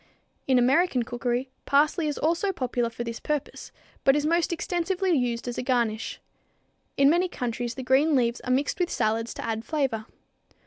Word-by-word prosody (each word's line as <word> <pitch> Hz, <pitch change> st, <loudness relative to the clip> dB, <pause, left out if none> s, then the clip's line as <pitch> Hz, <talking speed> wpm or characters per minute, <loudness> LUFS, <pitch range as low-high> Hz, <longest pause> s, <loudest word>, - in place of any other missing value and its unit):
In 260 Hz, -1 st, +4 dB
American 260 Hz, +2 st, +3 dB
cookery 245 Hz, +2 st, -2 dB, 0.2 s
parsley 300 Hz, +3 st, +3 dB
is 295 Hz, -, -2 dB
also 340 Hz, +5 st, +1 dB
popular 250 Hz, -7 st, -1 dB
for 230 Hz, +1 st, -5 dB
this 230 Hz, 0 st, -5 dB
purpose, 300 Hz, -2 st, -4 dB, 0.3 s
but 270 Hz, -, +5 dB
is 295 Hz, 0 st, +1 dB
most 335 Hz, +3 st, +2 dB
extensively 355 Hz, +2 st, -1 dB
used 245 Hz, -3 st, -1 dB
as 245 Hz, -, -3 dB
a -, -, 0 dB
garnish. 235 Hz, -4 st, -1 dB, 0.8 s
In 275 Hz, -, +5 dB
many 345 Hz, +5 st, +3 dB
countries 240 Hz, -6 st, -4 dB
the 260 Hz, -, -5 dB
green 280 Hz, +4 st, +3 dB
leaves 240 Hz, -2 st, +1 dB
are 255 Hz, -, -3 dB
mixed 280 Hz, +8 st, 0 dB
with 355 Hz, -1 st, +1 dB
salads 225 Hz, +2 st, 0 dB
to -, -, -5 dB
add 225 Hz, -1 st, -2 dB
flavor. 265 Hz, -8 st, -1 dB
260 Hz, 175 wpm, -26 LUFS, 240-315 Hz, 0.8 s, but